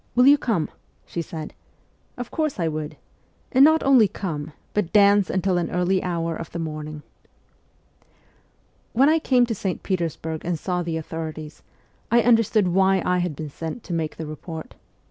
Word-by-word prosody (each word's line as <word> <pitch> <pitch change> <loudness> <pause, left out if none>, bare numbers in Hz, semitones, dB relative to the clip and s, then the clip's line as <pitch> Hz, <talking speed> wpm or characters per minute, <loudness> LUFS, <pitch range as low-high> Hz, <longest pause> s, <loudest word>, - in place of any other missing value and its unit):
Will 250 +1 +5
you 285 +2 +8
come? 205 - 0 0.2
' - - -39
she 170 - -4
said. 160 -1 -7 0.6
Of 245 -1 -6
course 310 -8 -1
I 165 - +1
would! 155 -1 -4 0.5
And 265 +1 +6
not 315 +2 +5
only 260 -6 +6
come, 160 -6 -5 0.2
but 205 -5 -1
dance 200 -1 +5
until 185 -1 +1
an 170 - -2
early 180 +1 +1
hour 170 -2 -2
of 165 - -7
the - - -5
morning. 155 -2 -5 1.9
When 270 +5 +5
I 320 +1 +4
came 255 -5 +3
to 235 - -2
St. 190 -3 -3
Petersburg 165 -3 -3
and 175 -1 -1
saw 180 +2 -2
the 165 -2 -2
authorities, 155 -1 -6 0.5
I 235 0 +4
understood 225 -4 +3
why 190 +1 +3
I 180 0 +2
had 175 -4 -2
been 150 0 -6
sent 165 - -6
to 175 - -6
make 160 -2 -2
the 160 - -5
report. 160 +1 -8
175 Hz, 175 wpm, -23 LUFS, 160-210 Hz, 1.9 s, you